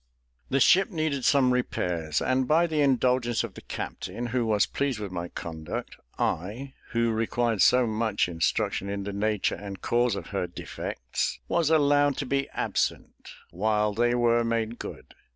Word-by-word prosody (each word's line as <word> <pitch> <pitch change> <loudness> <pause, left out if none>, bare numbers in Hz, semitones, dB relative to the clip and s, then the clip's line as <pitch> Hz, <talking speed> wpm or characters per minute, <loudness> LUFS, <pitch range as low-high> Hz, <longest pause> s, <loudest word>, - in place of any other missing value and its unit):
The 135 - +2
ship 190 +9 +5
needed 155 - -1
some 135 -5 +4
repairs, 85 -10 -1
and 130 0 +1
by 160 +4 +4
the 155 -3 0
indulgence 125 -3 +2
of 115 -5 -6
the - - -11
captain, 120 - -5
who 120 0 -1
was 105 -3 +3
pleased 140 -4 -1
with 105 -3 -5
my 85 -1 -4
conduct, 80 -2 -6 0.2
I, 115 - -2 0.2
who 115 0 +2
required 115 -1 0
so 125 +7 +5
much 110 -3 0
instruction 85 +3 -1
in 100 0 -3
the 100 0 -5
nature 105 0 0
and 100 -1 -7
cause 120 0 +1
of - - -7
her 95 -3 -2
defects, 90 - -4
was 170 -3 +1
allowed 145 -2 +3
to 140 - -2
be 135 +1 -1
absent - - -2 0.2
while 105 +3 +1
they 120 +3 +2
were 120 -1 +3
made 115 0 -1
good. - - -8
115 Hz, 165 wpm, -27 LUFS, 100-130 Hz, 0.2 s, ship